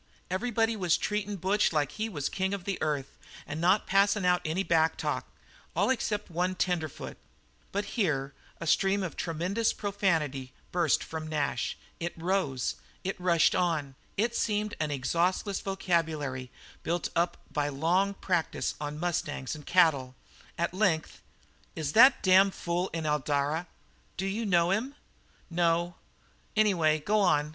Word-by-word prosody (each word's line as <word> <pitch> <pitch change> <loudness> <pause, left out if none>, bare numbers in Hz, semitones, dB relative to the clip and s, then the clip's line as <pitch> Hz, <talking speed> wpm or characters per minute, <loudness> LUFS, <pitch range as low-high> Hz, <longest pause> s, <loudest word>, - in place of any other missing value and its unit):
"Everybody 225 +3 +1
was 180 -5 +2
treatin' 210 -1 -2
Butch 195 +3 +2
like 150 -3 +1
he 215 +9 -3
was 145 -9 -4
the - - 0
king 190 +1 0
of 195 - -8
the 195 0 -3
earth 145 -3 -2 0.3
and 155 +2 -5
not 185 +5 +3
passin' 200 0 +3
out 180 0 +3
any 165 +5 -1
backtalk, 160 -3 +1 0.5
all - - +3
except 210 -6 -2
one 180 +2 0
tenderfoot 175 -5 -2 0.3
" - - -35
But 205 +1 -1
here 145 - -1 0.3
a - - -5
stream 195 +4 +2
of 180 - -4
tremendous 180 +7 0
profanity 160 - -1 0.2
burst 170 -4 +2
from 160 -1 -6
Nash. 145 -5 -1 0.2
It 170 +1 -4
rose, 165 -7 -1 0.3
it 195 - -2
rushed 170 -3 +4
on, 160 -6 0 0.2
it 235 +3 +1
seemed 210 -1 0
an 155 -1 0
exhaustless 170 +8 0
vocabulary 160 -9 -1 0.3
built 170 0 -1
up 170 +1 +1
by 145 -1 0
long 175 +8 +1
practice 175 -5 -1
on 150 0 -4
mustangs 155 -6 -2
and 150 -2 -9
cattle. 150 -8 +3 0.4
At 170 +1 -1
length: 185 -5 0 0.5
"Is 155 -3 -3
that 260 +4 +7
damned 190 0 +5
fool 175 +2 -1
in 165 -1 -3
Eldara?" 150 +2 0 0.5
"D'you 195 +4 -2
know 175 -2 +3
him?" 245 +8 -1 0.6
"No. 170 0 +1 0.6
Anyway, 175 -8 +4
go 210 +8 +1
on. 150 -6 +3
175 Hz, 145 wpm, -29 LUFS, 155-195 Hz, 0.6 s, that